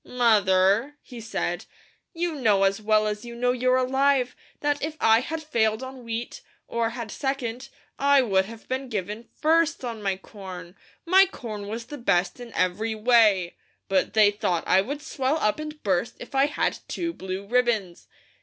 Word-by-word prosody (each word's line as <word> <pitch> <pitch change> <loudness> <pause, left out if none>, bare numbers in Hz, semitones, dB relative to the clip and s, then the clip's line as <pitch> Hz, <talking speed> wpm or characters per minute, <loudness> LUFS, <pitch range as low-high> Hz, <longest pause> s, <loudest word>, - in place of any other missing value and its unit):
"Mother," 215 +1 +3
he 245 -3 -10
said, 180 -5 -3 0.5
"you 345 -1 -2
know 215 -9 +2
as 195 +2 +1
well 215 0 +3
as 210 0 -3
you 235 0 -8
know 245 +1 +1
you're 255 +1 +2
alive, 265 0 +2 0.3
that 290 0 0
if 310 +1 -4
I 225 0 +5
had 315 +5 -4
failed 220 -5 0
on 260 -1 -8
wheat, 230 +1 -5 0.3
or 230 -1 0
had 235 -2 -6
second, 270 -1 -3 0.3
I 280 -1 +5
would 190 -5 +2
have 225 +2 -12
been 260 0 -3
given 210 +1 -4
FIRST 320 -3 +2
on 230 -3 -5
my 195 -2 -1
corn; 185 -3 -10 0.3
my 380 +3 +6
corn 215 - -7
was 230 +3 -5
the 290 +3 -8
best 200 -2 +1
in 240 -1 -9
every 215 +5 0
way, 215 -6 +3 0.3
but 190 -1 +1
they 215 -2 +6
thought 180 -5 -1
I 190 - +5
would 285 +8 -5
swell 270 +3 -1
up 215 -3 0
and 305 0 -7
burst 200 +4 0
if 245 - -10
I 270 +1 +4
had 295 - -1
two 335 -1 -3
blue 190 - -6
ribbons. 225 -6 0
230 Hz, 175 wpm, -25 LUFS, 205-265 Hz, 0.5 s, my